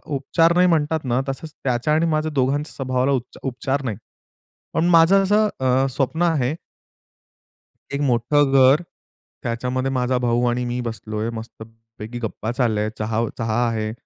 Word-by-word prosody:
उपचार 165 +5 +2
नाही 180 +1 +5
म्हणतात 160 -2 +1
ना, 125 0 +1
तसंच 145 +4 -5
त्याच्या 130 +3 0
आणि 160 +2 +2
माझ्या 155 0 0
दोघांच्या 140 +3 0
स्वभावाला 130 0 0
उप 130 -3 +1 0.2
उपचार 135 +1 -2
नाही. 110 -6 -3 0.8
पण 165 - +1
माझं 175 +4 +6
असं 210 +2 +3
अ, 130 +1 +2
स्वप्न 145 +5 -1
आहे 150 -6 +1 1.4
एक 140 - -1
मोठं 135 +2 +2
घर, 135 +4 +5 0.6
त्याच्यामध्ये 125 +3 -2
माझा 125 -1 0
भाऊ 120 0 +1
आणि 125 +1 -1
मी 120 0 -3
बसलो 110 -1 -6
आहे, 115 - -1
मस्त-पैकी 115 0 -10
गप्पा 110 +1 -3
चालल्या, 110 -4 0
चहा 110 +1 -1 0.2
चहा 115 +2 0
आहे 110 -2 -2
130 Hz, 150 wpm, -22 LUFS, 115-150 Hz, 1.4 s, माझं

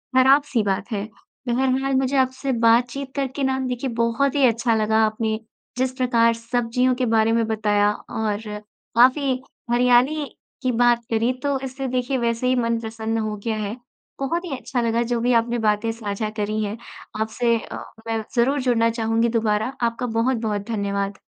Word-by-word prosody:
ख़राब-सी 265 -1 +4
बात 195 +3 -2
है। 200 -2 -2 0.4
बहरहाल 265 +2 +1
मुझे 265 +1 +1
आपसे 260 +1 0
बातचीत 245 +4 +2
करके 275 0 -2
ना 265 0 +1
देखिए 250 +1 -2
बहुत 235 +5 +1
ही 275 -2 +4
अच्छा 230 0 +1
लगा। 220 0 +1
आपने 220 0 -1 0.4
जिस 260 0 +1
प्रकार 230 -2 +3
सब्ज़ियों 240 +2 0
के 255 - 0
बारे 225 -1 +3
में 230 -1 +2
बताया 210 -1 +2 0.2
और 215 -2 -1 0.6
काफ़ी 260 +1 +4 0.3
हरियाली 250 +5 +3 0.4
की 255 -1 +1
बात 240 0 +3
करी, 230 +3 +2
तो 280 -2 0
इससे 265 0 -4
देखिए 255 +1 -1
वैसे 235 0 0
ही 255 - +3
मन 230 -2 0
प्रसन्न 225 0 -3
हो 215 -1 -2
गया 225 - 0
है। 210 0 -3 0.4
बहुत 335 +6 -1
ही 275 -6 -4
अच्छा 250 -1 -2
लगा 230 0 +1
जो 240 - +1
भी 245 +1 +2
आपने 235 +1 -3
बातें 210 +2 +1
साझा 215 -1 -4
करी 215 +1 -1
है। 210 +1 -4 0.4
आपसे 230 +2 +1
अ, - - -8 0.3
मैं 225 -1 -1
ज़रूर 265 +4 +2
जुड़ना 230 -2 +2
चाहूँगी 225 0 +1
दुबारा। 220 +3 0
आपका 235 +1 0
बहुत-बहुत 225 -3 -1
धन्यवाद। 200 -2 -2
235 Hz, 165 wpm, -22 LUFS, 220-255 Hz, 0.6 s, ख़राब-सी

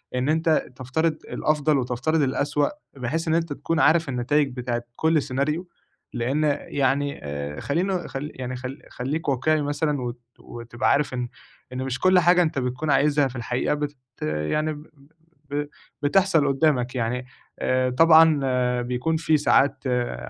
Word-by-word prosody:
إن 125 +3 0
أنت 160 0 +2
تفترض 155 +6 -1
الأفضل 150 -1 +1
وتفترض 130 +5 0
الأسوأ 145 +2 +1 0.3
بحيث 140 +7 -2
إن 160 - +2
أنت 165 -3 -1
تكون 160 +3 -2
عارف 160 0 +4
النتايج 135 +2 +1
بتاعة 120 -1 -3
كُل 160 -1 +2
scenario، 140 +5 -1 0.5
لإن 130 +5 0 0.2
يعني 140 +1 0
آآ 70 0 -5
خلّينا 180 +4 -1
خلّي 145 +3 -5
يعني 130 0 -5
خلّي 130 +2 -7
خلّيك 145 +5 -3
واقعي 150 +4 +1
مثلًا 145 -1 -1
وت 120 0 -5 0.2
وتبقى 120 +2 -2
عارف 145 -2 +1
إن 125 -1 -2 0.5
إن 130 - -3
مش 130 -1 -3
كُل 185 0 +5
حاجة 180 +1 +5
أنت 155 -4 0
بتكون 130 +4 -2
عايزها 145 0 +3
في 130 - -10
الحقيقة 120 +3 -1
بت 150 0 -3 0.3
يعني 75 - -1
ب 145 - -10 0.7
ب 145 - -4
ب 145 0 -1 0.3
بتحصل 165 0 +3
قدّامك 135 -3 +1
يعني، 125 +1 -2 0.3
آآ 130 0 +1
طبعًا 135 -5 +4
بيكون 125 +6 -1
في 160 -1 +2
ساعات 140 -1 +2
آآ 125 -1 0
140 Hz, 155 wpm, -24 LUFS, 125-155 Hz, 0.7 s, كُل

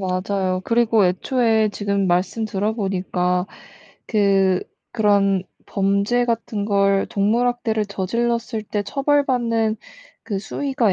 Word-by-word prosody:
맞아요. 185 0 -1
그리고 230 -3 +3
애초에 220 +4 +2
지금 200 -1 -1
말씀 185 +5 0
들어보니까 190 -3 -1 0.6
그 195 -3 +2 0.3
그런 200 -4 +2 0.2
범죄 200 +5 +1
같은 230 -3 -2
걸 200 -1 +2
동물 215 +5 +1
학대를 225 -3 0
저질렀을 230 +3 -2
때 205 0 -2
처벌받는 245 -4 +1 0.5
그 200 -3 -3
수위가 240 0 -1
205 Hz, 240 characters per minute, -21 LUFS, 195-230 Hz, 0.6 s, 그리고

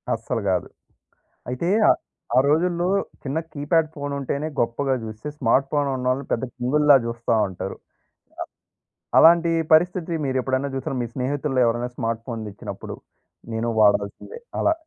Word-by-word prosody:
అస్సలు 115 +1 -3
కాదు. 90 -1 0 0.8
అయితే 125 +7 -2 0.2
ఆహ్, - - +5 0.4
ఆ - - +9
రోజుల్లో 175 +3 +2 0.4
చిన్న 140 +2 -2 0.2
కీప్యాడ్ 155 +2 +1
ఫోనుంటేనే 140 0 -3
గొప్పగా 130 +3 0
చూస్తే, 110 +5 -7
స్మార్ట్ 135 +2 +2
ఫోనున్నోళ్ళు 135 -2 0
పెద్ద 115 - -1
కింగుల్లా 145 +3 +4
జుస్తా 115 0 -1
ఉంటారు. 90 - -6 1.4
అలాంటి 170 0 +7 0.2
పరిస్థితి 175 +1 +3
మీరెప్పుడైనా 130 +1 0
చూసారా? 135 0 -3
మీ - - -3
స్నేహితుల్లో 135 +1 -1
ఎవరైనా 120 +1 0
స్మార్ట్ 115 -1 -2
ఫోన్ 115 -3 -4
తెచ్చినప్పుడు? 100 - -8 0.6
నేను 115 +1 -1
వాడాల్సిందే 100 - +1 0.2
అలా? 320 - +3
135 Hz, 120 wpm, -23 LUFS, 115-150 Hz, 1.4 s, ఆ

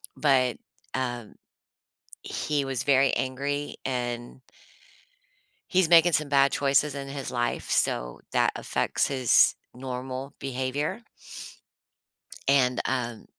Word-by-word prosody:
but, 130 -4 +2 0.4
um, 120 -4 -4 0.9
he 145 -2 -2
was 130 -3 -2
very 135 -1 +4
angry, 140 +2 -3
and 120 -1 -4 1.3
he's 185 -3 +3
making 170 0 +6
some 155 -2 +1
bad 140 -1 +4
choices 140 +1 +2
in 140 -1 -5
his 135 -1 -5
life, 120 -1 -2
so, - - 0
that - - +2
affects - - 0
his 130 -3 +4 0.2
normal 130 +2 -6
behavior 135 - -3 1.4
and, 130 -3 +3
um, 120 -3 -2
135 Hz, 105 wpm, -26 LUFS, 125-140 Hz, 1.4 s, making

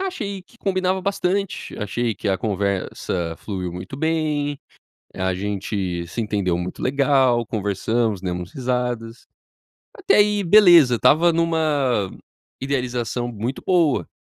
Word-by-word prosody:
achei 215 - -4
que 235 +5 -24
combinava 185 -1 0
bastante, 195 0 -2
achei 115 +2 -2
que 100 - -4
a 95 - +2
conversa 95 -4 -2
fluiu 90 -4 -5
muito 90 +8 -7
bem, 150 -2 -1 0.6
a 95 0 -1
gente 95 -2 -3
se 115 - -4
entendeu 100 -5 -1
muito 90 +1 -5
legal, 130 -3 +2
conversamos, 105 0 -1
demos 90 -1 -4
risadas. 125 -3 -3 0.7
Até - - +2
aí, 205 0 +3
beleza. 175 - +7
Estava 165 +8 +4
numa 150 - +1 0.5
idealização 125 -3 -2
muito 120 +3 -4
boa, 170 -7 +2
125 Hz, 120 wpm, -22 LUFS, 100-165 Hz, 0.7 s, beleza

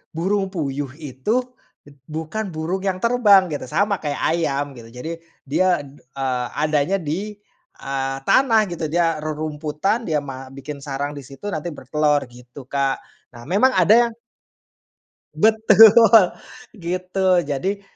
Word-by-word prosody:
burung 195 +4 0
puyuh 145 -6 -3
itu 160 - -2 0.6
bukan 160 +8 -4
burung 160 +4 -3
yang 185 -2 -1
terbang 210 -6 +5
gitu, 145 - -4
sama 200 +9 +1
kayak 145 -1 -3
ayam 145 -4 -1
gitu, 115 -1 -12
jadi 125 +7 -6 0.4
dia, 180 +5 +2
d 140 +1 -15
eee, 130 -2 -3
adanya 155 +4 +1
di, 185 +7 -4 0.4
eee, 135 0 -3
tanah 230 -5 +4
gitu, 165 -2 -3
dia 165 -1 +2
rerumputan, 155 +7 -2
dia 155 -3 +1
ma 135 -1 -8
bikin 140 +2 -8
sarang 140 +1 -3
di 140 - -8
situ, 135 +9 -10
nanti 165 +1 -4
bertelor 150 +2 0
gitu 125 +3 -13
Kak. 135 -1 -1 0.4
Nah, 120 - -11
memang 210 - +3
ada 215 - +5
yang 235 - -8 1.2
Betul 220 -1 +6 0.5
gitu. 185 +1 0
Jadi, 185 +8 -3
155 Hz, 135 wpm, -21 LUFS, 140-195 Hz, 1.2 s, Betul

